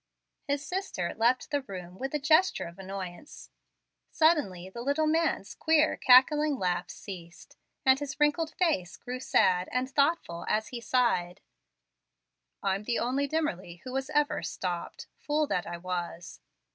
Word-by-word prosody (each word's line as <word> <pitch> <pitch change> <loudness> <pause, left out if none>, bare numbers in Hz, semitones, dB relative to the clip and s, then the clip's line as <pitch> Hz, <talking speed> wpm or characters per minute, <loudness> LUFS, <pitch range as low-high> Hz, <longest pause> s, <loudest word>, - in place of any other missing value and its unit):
His 285 +1 -1
sister 360 - -3
left 240 +3 +1
the 285 -1 +1
room 185 -6 -9
with 270 +3 -3
a - - +1
gesture 315 +6 +3
of 170 +3 -11
annoyance. 190 +4 -8 0.6
Suddenly 290 - +2
the 215 +5 -8
little 285 +5 +1
man's 315 -10 0
queer, 315 -1 +3
cackling 285 +3 +5
laugh 180 -3 -1
ceased, 170 -4 -10 0.3
and 265 0 +5
his 290 +1 -5
wrinkled 295 +2 +2
face 305 - 0
grew 250 0 -6
sad 180 -7 +2
and 250 +1 0
thoughtful 280 - 0
as 215 0 0
he 240 -2 -6
sighed: 230 -9 +1 1.2
"I'm 195 +2 0
the 235 0 0
only 265 +4 0
Dimmerly 185 - -3
who 255 - -7
was 270 +1 -2
ever 295 -1 +1
'stopped,' 175 -2 -4
fool 300 +1 0
that 180 - -2
I 175 - -5
was. 175 -1 -5
250 Hz, 145 wpm, -29 LUFS, 185-295 Hz, 1.2 s, cackling